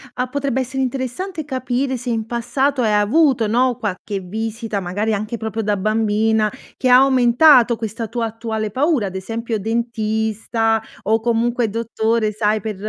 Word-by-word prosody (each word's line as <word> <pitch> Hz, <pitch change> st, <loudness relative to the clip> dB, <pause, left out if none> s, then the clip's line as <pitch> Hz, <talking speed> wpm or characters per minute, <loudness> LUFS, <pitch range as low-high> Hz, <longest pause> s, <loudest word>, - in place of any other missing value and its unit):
a 250 Hz, 0 st, -1 dB
potrebbe 275 Hz, -1 st, -2 dB
essere 265 Hz, +1 st, -2 dB
interessante 275 Hz, +6 st, -4 dB
capire 260 Hz, -1 st, -2 dB
se 245 Hz, 0 st, -4 dB
in 225 Hz, -1 st, -2 dB
passato 260 Hz, +3 st, 0 dB
hai 215 Hz, -1 st, +2 dB
avuto, 235 Hz, +3 st, +3 dB
no, 245 Hz, +3 st, +2 dB
qualche 200 Hz, 0 st, -3 dB
visita, 220 Hz, +2 st, -4 dB
magari 205 Hz, +4 st, -1 dB
anche 215 Hz, +3 st, -4 dB
proprio 220 Hz, 0 st, -3 dB
da 205 Hz, -1 st, 0 dB
bambina, 215 Hz, +1 st, +1 dB, 0.3 s
che 255 Hz, -, +1 dB
ha 250 Hz, -, +8 dB
aumentato 255 Hz, -1 st, +5 dB
questa 225 Hz, 0 st, -5 dB
tua 235 Hz, +1 st, -2 dB
attuale 220 Hz, -1 st, -4 dB
paura, 265 Hz, -, +1 dB
ad 190 Hz, -, -8 dB
esempio 225 Hz, +4 st, -3 dB
dentista 225 Hz, 0 st, -1 dB, 0.2 s
o 220 Hz, +2 st, +2 dB
comunque 235 Hz, -1 st, 0 dB
dottore, 225 Hz, -1 st, 0 dB
sai, 215 Hz, 0 st, 0 dB
per, 215 Hz, -2 st, -4 dB
225 Hz, 155 wpm, -20 LUFS, 215-250 Hz, 0.3 s, ha